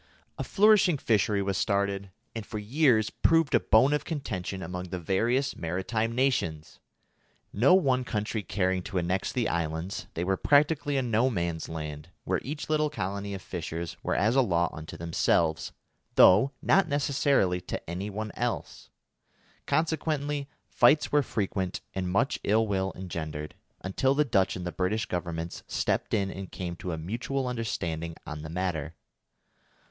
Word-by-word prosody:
A - - -1
flourishing 200 -5 +4
fishery 105 -5 +1
was 95 -1 -1
started, 100 -1 0 0.2
and 115 - -5
for 105 - -6
years 110 0 +2
proved 165 -3 +3
a 120 - +6
bone 130 +8 +4
of 150 - 0
contention 100 - -4
among 90 +2 -5
the 90 0 -5
various 115 - 0
maritime 100 +7 -2
nations. 85 - 0 0.7
No 130 - +5
one 130 -8 +2
country 110 -1 -2
caring 95 -2 0
to 95 - -5
annex 90 +2 0
the 125 -3 0
islands, 85 +2 -3
they 85 - -1
were 95 +1 +1
practically 145 -1 +3
a 135 - +1
no 120 +1 +2
man's 85 -7 -2
land, 75 -1 -6
where 95 -1 0
each 150 +5 -5
little 155 -1 +2
colony 100 -6 -4
of 95 - -8
fishers 85 -1 -5
were - - -1
as 110 +5 +2
a 135 - +6
law 85 -7 +1
unto 80 0 -8
themselves, 85 -1 +1 0.4
though 105 +9 +7
not 195 -2 +4
necessarily 140 - +1
to - - -6
any 90 +5 -4
one 110 +1 -4
else. - - -4 0.8
Consequently 150 -3 0 0.2
fights 150 +1 +4
were 145 - +4
frequent 95 -6 -2
and 95 -1 -2
much 110 +8 +1
ill 110 +2 +3
will 95 -2 -1
engendered, 80 -4 -5 0.3
until 130 +8 +1
the 150 +1 +3
Dutch 95 -7 +2
and 90 - -5
the 90 - -2
British 95 +5 -1
Governments 85 -1 -4
stepped - - 0
in 100 -2 0
and 95 -1 -7
came 90 -2 -5
to 90 - -5
a 80 - -3
mutual 120 +10 -3
understanding 85 -9 -3
on 75 0 -6
the 80 - -7
matter. 80 -3 -3
100 Hz, 160 wpm, -28 LUFS, 90-130 Hz, 0.8 s, though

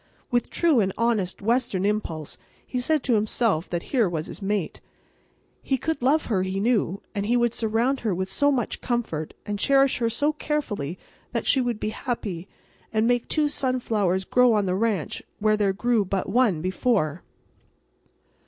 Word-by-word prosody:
With 240 -1 +1
true 325 -7 +3
and 195 -3 +2
honest 220 -6 0
Western 225 -4 +1
impulse 170 -8 -2 0.3
he 250 - -3
said 300 +3 +1
to 250 - +1
himself 210 -5 +1
that 175 -1 -2
here 235 -8 +3
was 160 -2 -3
his - - -8
mate. 200 -2 -2 0.8
He 265 - 0
could 320 +2 -2
love 290 +5 +3
her, 200 -6 0
he 190 +1 -2
knew; 205 -4 +1
and 200 -1 -2
he 240 +2 +3
would 240 -1 +2
surround 230 +4 +1
her 220 - -1
with 185 +1 -2
so 285 +8 +2
much 250 -5 -1
comfort, 225 -11 -2
and 205 -1 -3
cherish 275 +2 +3
her 230 -1 +1
so 290 +7 +1
carefully 215 - -3 0.4
that - - -1
she 265 - +4
would 240 -3 -1
be 215 - -2
happy, 205 -7 -4 0.4
and 220 0 +2
make 245 0 +1
two 305 -1 +1
sunflowers 220 -9 0
grow 250 +1 +4
on 210 -2 +2
the 180 - 0
ranch 200 -4 -1 0.2
where 215 0 +2
there 205 -2 +2
grew 230 +2 +1
but 190 0 -2
one 200 -7 +2
before. 185 - 0
220 Hz, 175 wpm, -25 LUFS, 190-250 Hz, 0.8 s, she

